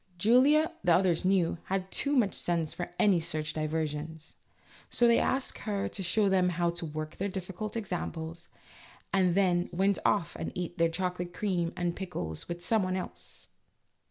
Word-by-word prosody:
Julia, 270 Hz, -, +5 dB
the 175 Hz, -2 st, +5 dB
others 180 Hz, -3 st, +2 dB
knew, 185 Hz, -3 st, +2 dB
had 190 Hz, 0 st, -2 dB
too 285 Hz, 0 st, +2 dB
much 220 Hz, -7 st, +3 dB
sense 170 Hz, -3 st, -1 dB
for 175 Hz, -, -5 dB
any 195 Hz, -4 st, +4 dB
such 155 Hz, -2 st, -2 dB
diver 155 Hz, +1 st, -1 dB
sions. 155 Hz, +1 st, -7 dB, 0.5 s
So 240 Hz, -, +3 dB
they 235 Hz, 0 st, +5 dB
asked 265 Hz, 0 st, -1 dB
her 200 Hz, -3 st, -2 dB
to 200 Hz, -, -5 dB
show 200 Hz, +3 st, +2 dB
them 185 Hz, -2 st, +3 dB
how 175 Hz, -1 st, 0 dB
to 170 Hz, -1 st, -5 dB
work 155 Hz, +1 st, -6 dB
their 200 Hz, +2 st, -1 dB
difficult 190 Hz, +3 st, -5 dB
examples, 170 Hz, -4 st, -5 dB, 0.6 s
and 185 Hz, -3 st, +3 dB
then 180 Hz, -3 st, +2 dB
went 195 Hz, +3 st, +1 dB
off 185 Hz, -5 st, +1 dB
and -, -, -4 dB
ate 175 Hz, 0 st, -4 dB
their 165 Hz, 0 st, +4 dB
chocolate 180 Hz, 0 st, -3 dB
creams 180 Hz, -5 st, -1 dB
and 175 Hz, -1 st, -1 dB
pickles 90 Hz, -, -5 dB
with 175 Hz, 0 st, -5 dB
some 220 Hz, -2 st, +3 dB
one 185 Hz, 0 st, -1 dB
else. 185 Hz, -, -7 dB
180 Hz, 175 wpm, -30 LUFS, 165-195 Hz, 0.6 s, Julia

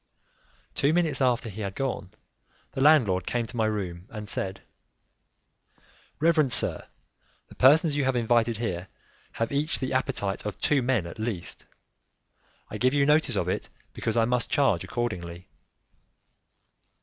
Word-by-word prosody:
Two 140 Hz, +3 st, +2 dB
minutes 160 Hz, -5 st, +2 dB
after 125 Hz, -2 st, +2 dB
he 110 Hz, 0 st, -7 dB
had 100 Hz, -1 st, -4 dB
gone, 125 Hz, -8 st, -3 dB, 0.6 s
the 135 Hz, -, -4 dB
landlord 120 Hz, -, +4 dB
came 120 Hz, -1 st, -1 dB
to 120 Hz, -, -10 dB
my 110 Hz, -2 st, +1 dB
room 95 Hz, -4 st, -4 dB
and 105 Hz, -2 st, -7 dB
said, 95 Hz, -1 st, -3 dB, 1.6 s
"Reverend 155 Hz, -4 st, +3 dB
sir, -, -, 0 dB, 0.6 s
the -, -, -13 dB
persons 150 Hz, +3 st, +5 dB
you 145 Hz, -, +1 dB
have 130 Hz, -1 st, +1 dB
invited 115 Hz, -1 st, +2 dB
here 95 Hz, -5 st, -3 dB, 0.5 s
have 115 Hz, -, -2 dB
each 145 Hz, +3 st, 0 dB
the 130 Hz, 0 st, -3 dB
appetite 125 Hz, -7 st, -1 dB
of 105 Hz, -, -5 dB
two 145 Hz, -3 st, +2 dB
men 120 Hz, -7 st, +1 dB
at 85 Hz, -, -9 dB
least; 110 Hz, -6 st, -4 dB, 1.0 s
I -, -, -5 dB
give 130 Hz, +3 st, +2 dB
you 140 Hz, -1 st, +4 dB
notice 150 Hz, +2 st, +3 dB
of -, -, 0 dB
it, -, -, -2 dB, 0.2 s
because 115 Hz, 0 st, -2 dB
I 115 Hz, -, +4 dB
must 125 Hz, +1 st, 0 dB
charge 125 Hz, -12 st, +2 dB
accordingly." 90 Hz, -7 st, -4 dB
120 Hz, 150 wpm, -27 LUFS, 100-135 Hz, 1.6 s, persons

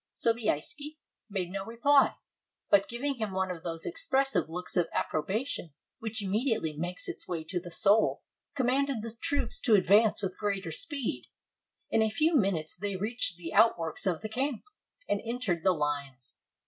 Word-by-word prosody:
Sobieski 235 Hz, -, -1 dB, 0.3 s
made 185 Hz, -3 st, -2 dB
no 195 Hz, 0 st, -3 dB
reply, 255 Hz, +6 st, +4 dB, 0.6 s
but 200 Hz, -1 st, +5 dB
giving 270 Hz, +3 st, -2 dB
him 220 Hz, -3 st, -2 dB
one 190 Hz, 0 st, 0 dB
of 170 Hz, -2 st, -6 dB
those 165 Hz, -1 st, -3 dB
expressive 270 Hz, -, +1 dB
looks 180 Hz, +2 st, -4 dB
of 175 Hz, -3 st, +2 dB
approbation 185 Hz, -, -2 dB, 0.2 s
which 220 Hz, -1 st, -3 dB
immediately 205 Hz, -, 0 dB
makes 175 Hz, +4 st, -4 dB
its -, -, -6 dB
way 170 Hz, -3 st, -3 dB
to 175 Hz, +3 st, -3 dB
the 175 Hz, 0 st, -9 dB
soul, 200 Hz, +5 st, +3 dB, 0.3 s
commanded 265 Hz, -2 st, +1 dB
the 230 Hz, 0 st, -5 dB
troops 320 Hz, -4 st, 0 dB
to 225 Hz, -5 st, +5 dB
advance 205 Hz, +3 st, +4 dB
with 185 Hz, -1 st, -3 dB
greater 195 Hz, -5 st, -1 dB
speed. 225 Hz, -, -2 dB, 0.6 s
In 225 Hz, -, +3 dB
a 220 Hz, -, +3 dB
few 310 Hz, +9 st, +2 dB
minutes 190 Hz, -, +1 dB
they 200 Hz, +2 st, -3 dB
reached 205 Hz, -2 st, -2 dB
the 170 Hz, -2 st, -7 dB
outworks 170 Hz, -7 st, +3 dB
of 175 Hz, -4 st, 0 dB
the 215 Hz, -, -4 dB
camp, 260 Hz, +1 st, -1 dB, 0.4 s
and 205 Hz, -, 0 dB
entered 225 Hz, -8 st, -2 dB
the 190 Hz, -, +5 dB
lines. 145 Hz, -5 st, -3 dB
205 Hz, 160 wpm, -30 LUFS, 175-240 Hz, 0.6 s, but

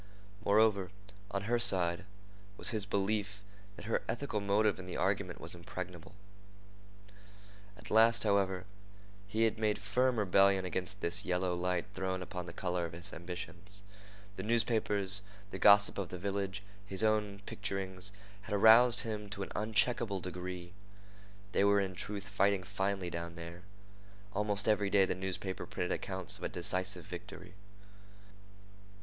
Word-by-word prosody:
Moreover, 100 Hz, -3 st, +3 dB, 0.4 s
on 100 Hz, -1 st, -3 dB
her 120 Hz, +3 st, +1 dB
side, 90 Hz, -4 st, +4 dB, 0.5 s
was -, -, +1 dB
his 110 Hz, -4 st, -2 dB
belief 100 Hz, 0 st, -1 dB, 0.3 s
that -, -, -10 dB
her 115 Hz, -, 0 dB
ethical 120 Hz, -2 st, -2 dB
motive 100 Hz, 0 st, +2 dB
in 90 Hz, -, -8 dB
the 90 Hz, -, -5 dB
argument 95 Hz, -1 st, -1 dB
was 80 Hz, -, -7 dB
impregnable. 90 Hz, +1 st, -8 dB, 1.6 s
At -, -, -12 dB
last, 115 Hz, +1 st, +5 dB
however, 95 Hz, -3 st, +1 dB, 0.6 s
he 110 Hz, +3 st, 0 dB
had 115 Hz, -1 st, +1 dB
made 105 Hz, -1 st, +1 dB
firm 120 Hz, +6 st, +1 dB
rebellion 95 Hz, -1 st, +4 dB
against 95 Hz, +2 st, -4 dB
this 85 Hz, -, 0 dB
yellow 90 Hz, 0 st, 0 dB
light 90 Hz, +1 st, -1 dB
thrown 95 Hz, -1 st, -2 dB
upon 90 Hz, -1 st, -6 dB
the -, -, -6 dB
color 90 Hz, 0 st, -2 dB
of -, -, -12 dB
his 85 Hz, +1 st, -5 dB
ambitions. 90 Hz, +3 st, -6 dB, 0.5 s
The -, -, -3 dB
newspapers, 105 Hz, -3 st, +4 dB, 0.3 s
the -, -, -6 dB
gossip 100 Hz, -1 st, +6 dB
of 95 Hz, -3 st, -3 dB
the 90 Hz, -, -6 dB
village, 100 Hz, +1 st, -3 dB, 0.2 s
his 100 Hz, 0 st, -1 dB
own 105 Hz, -2 st, +1 dB
picturings, 95 Hz, -2 st, -4 dB, 0.3 s
had 105 Hz, 0 st, -3 dB
aroused 110 Hz, +2 st, +7 dB
him 105 Hz, -2 st, -5 dB
to 100 Hz, 0 st, -4 dB
an -, -, -8 dB
uncheckable 110 Hz, -1 st, +2 dB
degree. 90 Hz, 0 st, -6 dB, 0.8 s
They 100 Hz, -, +2 dB
were 100 Hz, 0 st, +5 dB
in 95 Hz, -1 st, -1 dB
truth 100 Hz, +2 st, -4 dB
fighting 100 Hz, -2 st, +2 dB
finely 95 Hz, -1 st, -2 dB
down 85 Hz, 0 st, -5 dB
there. 85 Hz, +1 st, -8 dB, 0.7 s
Almost 105 Hz, 0 st, -1 dB
every 105 Hz, -2 st, +2 dB
day 100 Hz, -1 st, +5 dB
the -, -, -1 dB
newspaper 95 Hz, 0 st, -4 dB
printed -, -, -3 dB
accounts -, -, -3 dB
of -, -, -11 dB
a -, -, -1 dB
decisive 95 Hz, 0 st, 0 dB
victory. -, -, -9 dB
100 Hz, 145 wpm, -33 LUFS, 90-105 Hz, 1.6 s, aroused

